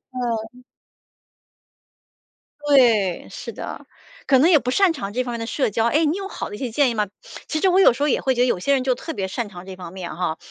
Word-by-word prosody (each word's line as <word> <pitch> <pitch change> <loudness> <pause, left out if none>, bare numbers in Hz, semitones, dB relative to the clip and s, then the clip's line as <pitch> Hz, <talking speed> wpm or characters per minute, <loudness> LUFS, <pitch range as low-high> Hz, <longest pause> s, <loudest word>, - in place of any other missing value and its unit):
嗯。 240 0 -4 2.0
对， 230 -10 +3
是 - - -7
的， - - -7 0.4
可 265 - +4
能 320 +7 +5
也 320 - +7
不 250 -2 -2
擅 390 +4 +4
长 240 -11 -5
这 255 +2 0
方 245 -1 -5
面 235 - -4
的 230 - -3
社 260 0 0
交。 225 +3 0
哎， 300 +7 +2
你 310 +5 0
有 390 -1 -5
好 - - -6
的 205 - -7
一 - - -8
些 250 -4 -4
建 280 +2 +3
议 235 - -2
吗？ 210 -1 0 0.4
其 310 - -2
实 380 - +4
我 370 - +4
有 380 - +6
时 260 - -9
候 295 - +3
也 - - +1
会 265 - +1
觉 245 - 0
得， 250 - +4
有 190 - +1
些 280 +9 +1
人 260 -2 +1
就 255 -2 +1
特 325 - -6
别 195 -7 -3
擅 205 +2 -4
长 180 -2 -11
这 190 - -7
方 180 -1 -10
面 185 -3 -6
哈， 170 -2 -2
245 Hz, 275 characters per minute, -22 LUFS, 205-280 Hz, 2.0 s, 也